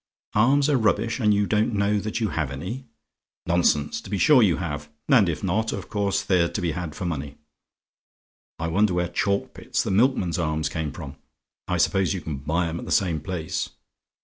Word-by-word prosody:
"ARMS 135 Hz, +7 st, +4 dB
ARE 145 Hz, -3 st, +3 dB
RUBBISH; 115 Hz, +2 st, +1 dB
AND 105 Hz, -3 st, +3 dB
YOU 100 Hz, 0 st, +3 dB
DON'T 105 Hz, +2 st, +1 dB
KNOW 100 Hz, +1 st, +2 dB
THAT 105 Hz, +3 st, -3 dB
YOU 110 Hz, -, +1 dB
HAVE 80 Hz, -7 st, -2 dB
ANY? 95 Hz, -, -6 dB, 0.6 s
"Nonsense: 85 Hz, +2 st, +1 dB
to 110 Hz, -, -11 dB
be 100 Hz, -, -1 dB
sure 135 Hz, +6 st, +6 dB
you 95 Hz, -7 st, +3 dB
have 75 Hz, -4 st, -4 dB, 0.2 s
and 115 Hz, -10 st, +5 dB
if 80 Hz, -, -3 dB
not, 105 Hz, +4 st, 0 dB
of 95 Hz, -3 st, -6 dB
course 100 Hz, -1 st, 0 dB
they're 90 Hz, -3 st, +2 dB
to -, -, -4 dB
be 85 Hz, -4 st, 0 dB
had 80 Hz, -1 st, -5 dB
for 90 Hz, -, -5 dB
money. 75 Hz, -4 st, -4 dB, 1.2 s
I 80 Hz, -, -3 dB
wonder 95 Hz, +2 st, +2 dB
where 90 Hz, -1 st, 0 dB
Chalkpit's, 100 Hz, +3 st, -1 dB
the -, -, -2 dB
milkman's 100 Hz, -5 st, +2 dB
arms, 75 Hz, -2 st, -1 dB
came 80 Hz, -3 st, -3 dB
from? 70 Hz, -4 st, -9 dB, 0.5 s
I 90 Hz, -, 0 dB
suppose 95 Hz, +2 st, +2 dB
you 90 Hz, -, -4 dB
can 75 Hz, -3 st, -5 dB
buy 80 Hz, +5 st, -1 dB
'em 85 Hz, +1 st, -4 dB
at -, -, -7 dB
the -, -, -5 dB
same 85 Hz, -5 st, +2 dB
place. 80 Hz, 0 st, -3 dB
90 Hz, 200 wpm, -24 LUFS, 80-105 Hz, 1.2 s, sure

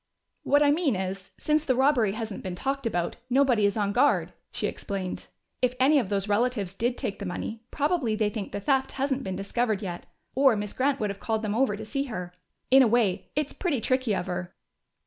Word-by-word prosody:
"What 290 Hz, +1 st, +4 dB
I 285 Hz, -, +5 dB
mean 295 Hz, -, +2 dB
is, 190 Hz, 0 st, -4 dB
since 305 Hz, 0 st, +1 dB
the 260 Hz, -5 st, +1 dB
robbery 255 Hz, -6 st, +3 dB
hasn't 220 Hz, -2 st, -5 dB
been 185 Hz, -2 st, -5 dB
talked 270 Hz, +4 st, -2 dB
about, 175 Hz, -6 st, -2 dB
nobody 250 Hz, -5 st, +4 dB
is 200 Hz, -, -2 dB
on 205 Hz, -1 st, +1 dB
guard," 260 Hz, +7 st, +2 dB, 0.2 s
she -, -, -2 dB
explained. 190 Hz, -2 st, -4 dB, 0.3 s
"If 250 Hz, 0 st, +2 dB
any 285 Hz, +3 st, +5 dB
of 220 Hz, -8 st, -2 dB
those 200 Hz, -1 st, 0 dB
relatives 210 Hz, -3 st, 0 dB
did 240 Hz, +5 st, -1 dB
take 195 Hz, -, -3 dB
the 200 Hz, -, -5 dB
money, 220 Hz, +5 st, -5 dB
probably 290 Hz, -7 st, 0 dB
they 215 Hz, -1 st, +1 dB
think 210 Hz, -4 st, -5 dB
the 200 Hz, -, -3 dB
theft 265 Hz, +5 st, +1 dB
hasn't 270 Hz, 0 st, -1 dB
been 190 Hz, -1 st, -3 dB
discovered 210 Hz, +2 st, -1 dB
yet, 175 Hz, -2 st, -6 dB, 0.3 s
or 270 Hz, -3 st, +5 dB
Miss 205 Hz, -1 st, -4 dB
Grant 275 Hz, +1 st, +1 dB
would 210 Hz, -2 st, 0 dB
have 200 Hz, -, -9 dB
called 220 Hz, -1 st, -1 dB
them 210 Hz, -1 st, -1 dB
over 230 Hz, -3 st, +1 dB
to 220 Hz, -, -7 dB
see 275 Hz, +5 st, -2 dB
her. 180 Hz, -8 st, -6 dB, 0.4 s
In 270 Hz, +1 st, +8 dB
a 255 Hz, -, +6 dB
way, 210 Hz, -5 st, +1 dB
it's 295 Hz, -1 st, -1 dB
pretty 335 Hz, -9 st, -1 dB
tricky 255 Hz, -2 st, +1 dB
of -, -, -2 dB
her." 180 Hz, -1 st, -5 dB
225 Hz, 215 wpm, -27 LUFS, 200-270 Hz, 0.4 s, In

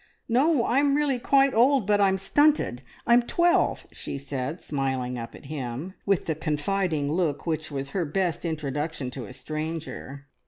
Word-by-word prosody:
"No 265 Hz, +2 st, +3 dB
I'm 275 Hz, +3 st, +3 dB
really 285 Hz, -4 st, +1 dB
quite 275 Hz, +2 st, +4 dB
old, 250 Hz, +1 st, +4 dB
but 205 Hz, 0 st, +3 dB
I'm 190 Hz, -1 st, +4 dB
stunted. 240 Hz, -, +2 dB, 0.2 s
I'm 240 Hz, +1 st, +6 dB
twelve!" 345 Hz, +8 st, +2 dB
she -, -, -6 dB
said, 140 Hz, +3 st, -4 dB
smiling 130 Hz, -3 st, -2 dB
up 115 Hz, 0 st, -7 dB
at -, -, -13 dB
him, 140 Hz, +4 st, -5 dB
with 195 Hz, -2 st, +2 dB
the 160 Hz, -, 0 dB
confiding 155 Hz, 0 st, -1 dB
look 155 Hz, -4 st, 0 dB
which 160 Hz, -2 st, -2 dB
was 140 Hz, -1 st, -4 dB
her 190 Hz, -, 0 dB
best 170 Hz, +2 st, -1 dB
introduction 150 Hz, -3 st, -3 dB
to 125 Hz, -4 st, -7 dB
a -, -, -10 dB
stranger. 155 Hz, 0 st, -6 dB
160 Hz, 160 wpm, -26 LUFS, 140-225 Hz, 0.2 s, I'm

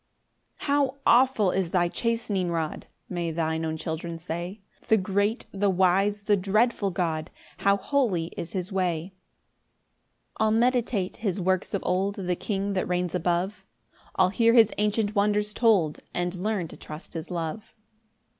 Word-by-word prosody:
1 -, -, -8 dB
"How 280 Hz, -1 st, +2 dB
awful 240 Hz, -6 st, +4 dB
is 190 Hz, -3 st, 0 dB
thy 175 Hz, 0 st, +2 dB
chastening 210 Hz, -3 st, -1 dB
rod!" 165 Hz, -2 st, -3 dB, 0.2 s
(May 175 Hz, -2 st, -2 dB
thine 160 Hz, 0 st, -1 dB
own 160 Hz, 0 st, -2 dB
children 165 Hz, +1 st, -4 dB
say) 175 Hz, +4 st, -5 dB, 0.3 s
"The 220 Hz, -, +5 dB
great, 200 Hz, +4 st, 0 dB
the 200 Hz, 0 st, +1 dB
wise, 195 Hz, +2 st, +2 dB
the 205 Hz, 0 st, +3 dB
dreadful 205 Hz, +2 st, +1 dB
God! 165 Hz, -4 st, -2 dB, 0.3 s
"How 200 Hz, 0 st, +3 dB
holy 195 Hz, -, 0 dB
is 170 Hz, -, -6 dB
his 185 Hz, 0 st, -3 dB
way!" 180 Hz, -1 st, -1 dB, 1.3 s
2 -, -, +3 dB
I'll -, -, +3 dB
meditate 235 Hz, -4 st, +1 dB
his 200 Hz, -4 st, -2 dB
works 185 Hz, +2 st, 0 dB
of 195 Hz, -, -3 dB
old; 190 Hz, +2 st, 0 dB
The 180 Hz, -2 st, -1 dB
King 200 Hz, +1 st, -2 dB
that 185 Hz, -, -1 dB
reigns 180 Hz, -1 st, -1 dB
above; 180 Hz, +3 st, -1 dB, 0.5 s
I'll 185 Hz, -1 st, +4 dB
hear 230 Hz, +4 st, +3 dB
his 225 Hz, -3 st, +6 dB
ancient 210 Hz, 0 st, +1 dB
wonders 210 Hz, 0 st, +1 dB
told, 200 Hz, -11 st, +3 dB, 0.2 s
And 175 Hz, 0 st, -1 dB
learn 190 Hz, -1 st, -2 dB
to -, -, -11 dB
trust 155 Hz, +2 st, -9 dB
his 165 Hz, -1 st, -6 dB
love. 175 Hz, +4 st, -5 dB
190 Hz, 155 wpm, -26 LUFS, 175-210 Hz, 1.3 s, his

